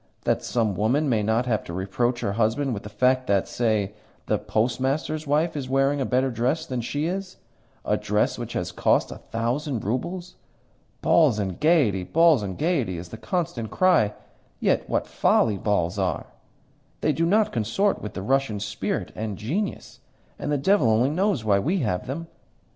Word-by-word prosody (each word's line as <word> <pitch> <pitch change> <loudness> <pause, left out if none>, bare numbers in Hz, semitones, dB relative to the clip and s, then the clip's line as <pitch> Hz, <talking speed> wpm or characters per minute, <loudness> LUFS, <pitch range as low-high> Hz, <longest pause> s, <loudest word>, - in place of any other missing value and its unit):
That - - +1
some 115 -4 0
woman 125 +10 +1
may 110 -4 +2
not 110 +4 +1
have 115 -4 0
to 85 - -7
reproach 120 +7 -1
her 100 - -1
husband 115 +5 0
with 100 - -4
the 105 - -9
fact 130 +4 +2
that, 100 -1 +2
say, 110 -4 0 0.3
the - - 0
Postmaster's 135 +7 -1
wife 155 +4 +1
is 135 -3 -4
wearing 135 +1 +2
a - - 0
better 130 +1 +1
dress 130 +8 0
than 130 -5 -3
she 145 +6 -2
is 185 +2 -4 0.5
a - - +2
dress - - 0
which - - -5
has - - -2
cost - - +2
a - - -7
thousand 120 +3 -2
roubles! 175 - -3 0.7
'Balls 150 -10 +4
and 95 -4 -3
gaiety, 140 - +3
balls 165 - +4
and 95 -2 -5
gaiety' 145 - 0
is 85 +1 -8
the 110 - -8
constant 170 - -2
cry. 140 - +3 0.4
Yet - - +1
what - - 0
folly 105 -4 +2
balls 100 -2 0
are! 95 -4 -1 0.8
They 155 - +2
do 165 +4 +1
not 215 +3 +3
consort 120 - 0
with 105 - -7
the 95 - -4
Russian 135 -3 +1
spirit 105 - -3
and 105 -3 -4
genius, 175 - -3 0.4
and 145 - -3
the 145 - +2
devil 165 - +3
only 115 +5 +3
knows 180 - 0
why 100 -2 +4
we 170 - 0
have 100 -7 -1
them. 150 +6 -4
125 Hz, 180 wpm, -25 LUFS, 105-155 Hz, 0.8 s, Balls